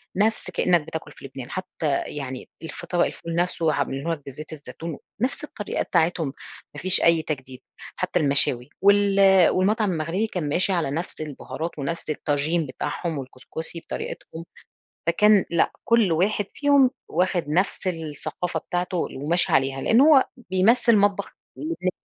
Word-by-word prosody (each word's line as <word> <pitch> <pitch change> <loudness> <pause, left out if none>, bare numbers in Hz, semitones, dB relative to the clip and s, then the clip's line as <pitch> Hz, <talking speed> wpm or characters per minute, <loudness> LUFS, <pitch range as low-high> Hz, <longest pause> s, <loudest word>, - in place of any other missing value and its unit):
نفس 215 +3 +1
كأنَّك 175 -2 +3
بتاكُل 150 -1 -7
في - - -13
لبنان، 130 -2 -8
حتى 165 -6 -2
يعني 130 -3 -6
الفط 160 - -8
طبق 175 -1 +3
الفول 165 0 -5
نفسُه 170 -3 +1
عاملينُه 140 +6 -2
لك 150 - -7
بزيت 145 +3 -9
الزيتون 155 +1 -7 0.2
نفس 260 +4 0
الطريقة 210 -8 -3
بتاعتهُم، 170 -1 +1 0.5
ما - - -8
فيش 185 +1 +4
أي 170 -1 +5
تجديد، 135 -4 -6 0.3
حتى 185 -1 -1
المشاوي 140 -4 +2
وال 195 -2 +5
والمطعم 205 +2 +2
المغربي 170 +6 -1
كان 175 -8 -3
ماشي 185 +5 +1
على 165 -6 0
نفس 160 +1 -4
البُهارات 155 +3 -5
ونفس 155 +3 -4
الطاچين 150 +3 0
بتاعهُم 155 +4 -4
والكُسكُسي 135 +5 -7
بطريقتهم، 165 0 -7 0.6
فكان 210 +4 +5
لأ، 170 - +2
كُل 230 -7 +3
واحد 200 +5 +1
فيهم 285 -3 +4 0.2
واخد 175 -2 0
نفس 185 +4 0
الثقافة 165 +1 -3
بتاعته 180 +1 -3
وماشي 160 +4 0
عليها، 135 0 +2
لأنه 230 - +5
هو 275 -4 +7 0.3
بيمثِّل 225 +5 +4
مطبخ 200 -1 +1 0.3
اللبنا 310 - -2
170 Hz, 145 wpm, -24 LUFS, 150-195 Hz, 0.6 s, هو